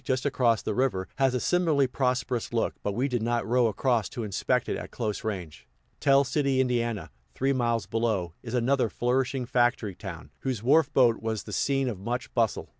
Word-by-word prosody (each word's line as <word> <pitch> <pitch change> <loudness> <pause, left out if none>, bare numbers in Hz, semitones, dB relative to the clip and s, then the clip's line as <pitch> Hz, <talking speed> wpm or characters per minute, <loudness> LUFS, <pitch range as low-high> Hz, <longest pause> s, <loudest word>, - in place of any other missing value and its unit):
just 130 0 -1
across 120 -5 +2
the 110 - -1
river, 110 -6 0
has 135 -2 +2
a - - +1
similarly 160 -3 +2
prosperous 125 -2 -1
look, 115 -1 0
but 100 - -2
we 125 +7 0
did 125 -4 -1
not 120 +1 0
row 120 0 +3
across 115 +1 0
to 120 - -5
inspect 105 -3 0
it - - -1
at - - -7
close 110 -4 -3
range. 80 - -5 0.3
Tell 140 -1 +5
City, 140 0 0
Ind., 120 -8 0 0.3
three 135 +1 +1
miles 120 -3 0
below, 110 -7 -1
is 120 0 -5
another 125 0 +2
flourishing 125 +2 0
factory 120 -4 +1
town, - - -9
whose 125 -5 -3
wharf 155 +6 +4
boat 120 -3 +4
was 110 -1 -2
the - - -8
scene 135 -1 +1
of 110 -7 -3
much 120 +5 -4
bustle. 115 -3 0
120 Hz, 190 wpm, -27 LUFS, 110-130 Hz, 0.3 s, Tell